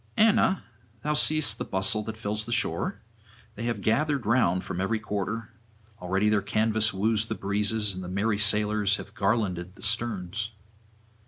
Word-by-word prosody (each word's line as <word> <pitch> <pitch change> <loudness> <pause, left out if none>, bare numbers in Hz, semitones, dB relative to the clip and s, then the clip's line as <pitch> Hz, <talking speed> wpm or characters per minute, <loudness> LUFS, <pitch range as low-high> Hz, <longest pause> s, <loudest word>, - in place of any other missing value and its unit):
'Anna, 215 -3 +4 0.4
thou 150 - 0
seest 155 0 +3
the - - -1
bustle 95 +3 +2
that 110 -1 -6
fills 105 0 -3
the 120 - -7
shore. 135 +8 0 0.5
They 115 +2 -6
have 120 -1 -2
gathered 140 +3 +1
round 105 -6 +2
from 90 - -4
every 110 +4 0
quarter; 105 +2 -4 0.5
already 95 +3 0
their 105 -1 +3
canvas 110 +2 +2
woos 110 +3 +1
the 110 - -4
breezes, 105 +1 0
and 95 0 -6
the 90 - -6
merry 100 +3 0
sailors 105 -1 +2
have 100 - -9
garlanded 95 -4 -1
the - - -11
sterns. 110 -1 -2
105 Hz, 160 wpm, -27 LUFS, 100-115 Hz, 0.5 s, Anna